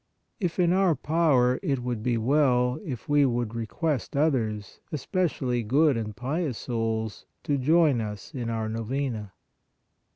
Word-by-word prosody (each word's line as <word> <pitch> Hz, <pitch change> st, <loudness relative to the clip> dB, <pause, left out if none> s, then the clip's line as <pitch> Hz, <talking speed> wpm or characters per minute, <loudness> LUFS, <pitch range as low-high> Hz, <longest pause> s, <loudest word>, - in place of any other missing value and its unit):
If 180 Hz, -5 st, -2 dB
in 175 Hz, -1 st, +3 dB
our 185 Hz, -3 st, +3 dB
power, 140 Hz, -5 st, +2 dB
it 135 Hz, -9 st, -1 dB
would 120 Hz, -3 st, -2 dB
be 120 Hz, +1 st, 0 dB
well, 125 Hz, 0 st, +2 dB
if 130 Hz, -, -6 dB
we 145 Hz, 0 st, +4 dB
would 120 Hz, -4 st, 0 dB
request 125 Hz, +5 st, -2 dB
others, 110 Hz, -9 st, 0 dB
especially 140 Hz, -5 st, -1 dB
good 140 Hz, +6 st, +3 dB
and 110 Hz, -2 st, -4 dB
pious 135 Hz, -, -2 dB
souls, 110 Hz, -3 st, -3 dB, 0.2 s
to 145 Hz, -, 0 dB
join 150 Hz, -2 st, +4 dB
us 105 Hz, +6 st, -6 dB
in 120 Hz, -4 st, -3 dB
our 110 Hz, -1 st, -2 dB
Novena. 115 Hz, -1 st, -3 dB
125 Hz, 140 wpm, -27 LUFS, 115-150 Hz, 0.2 s, we